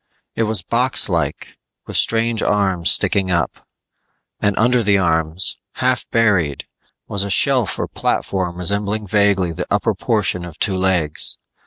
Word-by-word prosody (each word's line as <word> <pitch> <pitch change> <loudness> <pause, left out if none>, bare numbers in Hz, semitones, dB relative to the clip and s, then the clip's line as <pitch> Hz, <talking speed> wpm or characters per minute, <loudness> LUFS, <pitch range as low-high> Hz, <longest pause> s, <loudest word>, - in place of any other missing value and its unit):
It - - -3
was 105 -5 +3
boxlike 90 - 0 0.3
with - - -7
strange 115 0 +1
arms 95 -4 +1
sticking 95 -2 +2
up; 85 -2 -2 0.7
and 100 -1 0
under 120 +2 +3
the 100 -2 +2
arms, 80 0 +1 0.2
half 125 -2 -1
buried, 95 -11 +1 0.4
was 100 -1 0
a 100 - -5
shelf 125 0 +2
or - - -3
platform 90 -3 -2
resembling 100 +3 +1
vaguely 100 -3 +1
the 90 +2 -5
upper - - 0
portion 100 -5 -1
of 85 -2 -10
two 100 -3 0
legs. 90 -5 0
100 Hz, 140 wpm, -18 LUFS, 90-110 Hz, 0.7 s, was